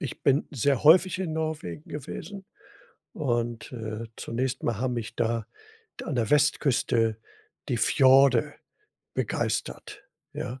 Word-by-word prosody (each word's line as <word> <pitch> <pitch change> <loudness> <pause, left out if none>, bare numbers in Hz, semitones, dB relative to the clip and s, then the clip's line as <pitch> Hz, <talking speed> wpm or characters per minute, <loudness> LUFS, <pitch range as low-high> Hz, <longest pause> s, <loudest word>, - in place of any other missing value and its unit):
ich 140 - -6
bin 140 +1 +3
sehr 140 -2 +1
häufig 180 +4 +6
in 180 -4 -2
Norwegen 155 - -4
gewesen 185 +7 -7 0.7
und, 120 -5 -2
äh, 110 -1 -5
zunächst 130 +3 -3
mal 115 -4 0
haben 125 +1 -1
mich 115 -3 -5
da 115 -2 -1 0.5
da - - -7
an 155 - -2
der 115 -3 0
Westküste 130 -6 +2 0.5
die 120 - 0
Fjorde 130 +1 +4 0.6
begeistert, - - -3 0.3
ja? 125 +1 -5
130 Hz, 125 wpm, -27 LUFS, 115-150 Hz, 0.7 s, häufig